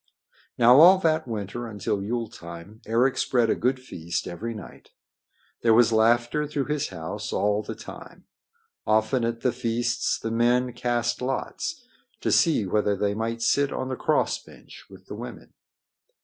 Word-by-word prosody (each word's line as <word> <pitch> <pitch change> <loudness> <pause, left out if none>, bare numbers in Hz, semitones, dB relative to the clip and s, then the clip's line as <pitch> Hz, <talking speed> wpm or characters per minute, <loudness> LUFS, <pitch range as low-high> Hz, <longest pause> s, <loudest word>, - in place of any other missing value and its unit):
Now 120 +2 +7
all 180 +4 +9
that 160 -3 +1
winter 115 +1 -4
until 105 -2 -3
Yule 115 +3 -2
time 85 0 -11
Eric 120 +4 +2
spread 120 -3 +2
a - - +2
good 130 +2 0
feast 85 -9 -5
every 115 +7 -5
night. 105 - -11 0.7
There 115 -1 +4
was 120 0 +5
laughter 120 +6 +2
through 145 -2 -2
his 150 -1 -1
house 95 +5 -6
all 105 +1 +1
the - - -7
time. - - -12 0.6
Often 110 +3 +2
at 115 0 -3
the 125 - +2
feasts 120 0 -1
the 115 - -4
men 120 +2 +2
cast 120 0 -1
lots 135 - -3 0.4
to - - 0
see 155 - +3
whether 105 +1 +1
they 100 +1 0
might 115 +2 -3
sit 140 +4 +2
on 130 - -3
the 130 - -2
cross 155 - 0
bench - - -15
with - - -15
the - - -8
women. - - -9
115 Hz, 165 wpm, -25 LUFS, 105-125 Hz, 0.7 s, all